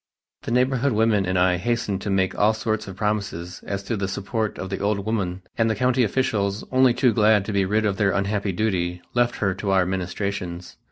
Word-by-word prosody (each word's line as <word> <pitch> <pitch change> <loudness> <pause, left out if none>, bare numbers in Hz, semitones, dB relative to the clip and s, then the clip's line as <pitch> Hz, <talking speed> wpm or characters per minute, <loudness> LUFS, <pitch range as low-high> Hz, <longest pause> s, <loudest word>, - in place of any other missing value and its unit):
The - - -6
neighborhood 130 +1 +2
women 105 -3 +2
and 95 0 0
I 90 0 +3
hastened 105 -1 -1
to 105 - -4
make 95 -1 +1
all 105 +2 +2
sorts 110 -1 -2
of 95 - -7
promises 100 -4 -3
as 100 -1 -3
to 115 - -2
the 100 -2 -2
support 105 +3 -3
of 95 0 -6
the 95 - -2
old 100 -1 -1
woman 95 -4 -2 0.2
and 115 0 +3
the 110 - +1
country 125 +3 +2
officials, 105 -4 0
only 130 -2 +4
too 125 -2 +3
glad 105 -3 +4
to 105 - -4
be 100 -1 +2
rid 110 +3 +1
of 100 -2 0
their 100 -1 +2
unhappy 100 +1 0
duty, 90 -3 -1
left 120 0 +2
her 95 -2 0
to 100 +1 -4
our 95 -2 +3
ministrations. 90 -1 -4
100 Hz, 215 wpm, -23 LUFS, 95-110 Hz, 0.2 s, only